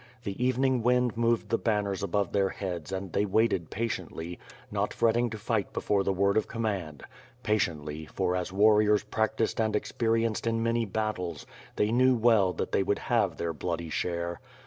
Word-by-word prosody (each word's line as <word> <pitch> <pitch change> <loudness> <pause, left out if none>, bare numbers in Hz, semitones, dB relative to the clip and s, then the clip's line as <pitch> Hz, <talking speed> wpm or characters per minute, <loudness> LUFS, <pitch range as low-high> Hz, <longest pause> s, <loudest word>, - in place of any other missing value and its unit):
The 100 +3 -3
evening 130 0 +2
wind 125 0 +2
moved 115 0 +1
the 115 - +1
banners 105 -3 0
above 100 0 0
their 100 -1 +2
heads 90 -4 -5
and 95 -2 -4
they 100 - +2
waited 100 -4 +1
patiently, 90 -6 -4 0.3
not - - -1
fretting 120 +1 +2
to 110 - -6
figiht 105 -1 -2
before 100 -1 +1
the 95 - +1
word 100 +2 +2
of 110 - +1
command 100 - -3 0.2
— - - -27
patiently, 80 -7 -1
for, 90 +2 -1
as 90 0 -2
warriors 105 +1 +4
practised 110 +1 0
and 110 -1 0
experienced 115 +1 0
in 115 0 0
many 115 0 +1
battles, 95 -6 -3 0.3
they 105 +1 +1
knew 130 +2 +4
well 110 -5 +4
that - - -3
they - - +2
would 100 +1 +1 0.2
have - - +2
their 85 -1 -2
bloody 85 0 -4
share. 85 0 -2
105 Hz, 175 wpm, -28 LUFS, 90-115 Hz, 0.3 s, warriors